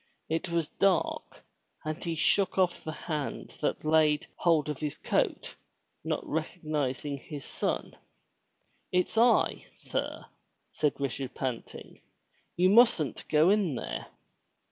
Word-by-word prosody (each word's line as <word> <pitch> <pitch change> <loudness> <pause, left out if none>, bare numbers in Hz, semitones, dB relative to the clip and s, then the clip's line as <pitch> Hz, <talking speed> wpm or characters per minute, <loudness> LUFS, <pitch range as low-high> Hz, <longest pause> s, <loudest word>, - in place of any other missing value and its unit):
It 160 +3 -1
was 170 -2 0
dark 195 -3 0 0.4
and 155 +2 -4
he 170 -1 -2
shook 195 +5 +2
off 180 -2 +2
the 155 - -4
hand 150 -2 -4
that - - -1
laid 155 -1 +4
hold 165 -4 +3
of 150 -3 -3
his 150 -2 -3
coat, - - -1 0.5
not - - -2
recognizing 145 -2 -2
his 145 0 -8
son. - - -2 0.5
" - - -44
It's 180 +3 +1
I, 235 +2 +3
sir/' - - -4 0.5
said 150 -2 +1
Richard 135 -1 -3
panting. 130 -3 -5 0.3
" - - -41
You 180 +1 +5
mustn't 210 - +4
go 155 +4 +5
in 200 -9 +2
there.'' 65 - -4
155 Hz, 130 wpm, -29 LUFS, 145-180 Hz, 0.5 s, You